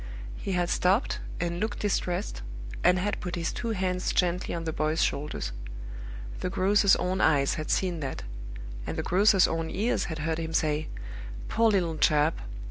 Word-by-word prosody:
He 195 - -3
had 175 -1 +1
stopped 195 +8 +2 0.2
and 170 0 -1
looked 215 +1 -1
distressed, 175 - -1 0.4
and 180 - +5
had 205 +3 -1
put 180 - -3
his 170 -1 -2
two 235 - -4
hands 185 -3 0
gently 180 0 +1
on 165 - -3
the 160 -1 -2
boy's 155 +2 +1
shoulders. 145 - -1 0.9
The - - -1
grocer's 200 +2 +4
own 185 +1 0
eyes 140 -3 +4
had 155 - -4
seen 180 -3 +1
that; 135 -3 -4 0.6
and - - -3
the - - -1
grocer's 195 +1 +5
own 165 0 -1
ears 220 +6 0
had 160 - -4
heard 160 +2 -1
him 160 0 -3
say, 155 -1 +1 0.6
"Poor 230 0 +4
little 175 -6 +1
chap! 150 +1 +3
175 Hz, 170 wpm, -28 LUFS, 160-190 Hz, 0.9 s, and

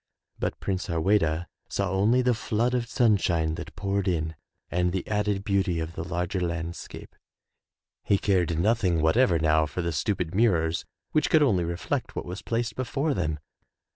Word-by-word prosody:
But - - -2
Prince 95 -1 -2
Harweda 85 -1 +1 0.2
saw 100 -2 -1
only 110 +7 +3
the 125 0 +3
flood 115 +2 0
of 120 -2 -1
sunshine 90 -9 +2
that 80 - -7
poured 100 0 -1
in, 80 -3 0 0.4
and 90 0 +1
the 95 0 -3
added 105 -2 0
beauty 100 -4 +1
of 80 +1 -4
the 80 - -4
larger 90 +2 -2
landscape. 85 -1 -5 0.9
He 100 - +3
cared 90 -5 +1
noth 110 +7 +2
ing 85 -3 +2
whatever 90 +2 +4
now 80 -1 +3
for 90 +4 -4
the 85 - -1
stupid 85 +2 -1
mirrors 85 -7 +2 0.3
which 155 - +2
could 155 -2 +5
only 95 -11 +3
reflect 85 +1 -3
what - - -3
was 90 +3 -6
placed 115 +1 -2
before 135 +4 -1
them. 80 - -1
95 Hz, 170 wpm, -27 LUFS, 85-105 Hz, 0.9 s, could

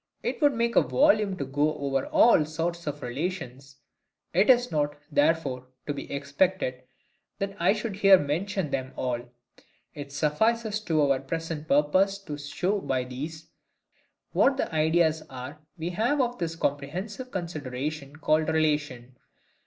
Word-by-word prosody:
It - - -3
would 290 -3 +4
make 235 0 0
a - - +7
volume 215 -10 +3
to 140 - -3
go 145 +3 0
over 135 -2 -1
all 230 -9 +5
sorts 165 +2 -3
of 145 0 -4
RELATIONS: 135 -1 -5 0.6
it 195 +7 +3
is 245 -1 +5
not, 145 -2 0
therefore, 145 -4 +1 0.2
to 145 - -2
be 140 - -7
expected 140 -1 0 0.6
that 195 0 -3
I 175 +3 +4
should 215 -2 -4
here 195 -1 +7
mention 170 +2 -2
them 130 -1 -3
all. 125 -2 -2 0.7
It 145 -2 -8
suffices 215 +9 +1
to 155 -3 +2
our 140 -2 +2
present 160 +2 -4
purpose 185 +8 +3
to 150 -5 -6
show 180 +8 -1
by 130 -8 -1
these, 150 +6 -7 0.8
what 270 -1 +3
the 220 - -2
ideas 160 0 +2
are 130 +3 -8 0.2
we 170 +2 -3
have 235 +11 +1
of 245 -1 0
this 165 -1 -2
comprehensive 175 - -3
consideration 150 - -5
called 155 +1 +1
RELATION. 150 -6 -1
155 Hz, 145 wpm, -27 LUFS, 140-190 Hz, 0.8 s, a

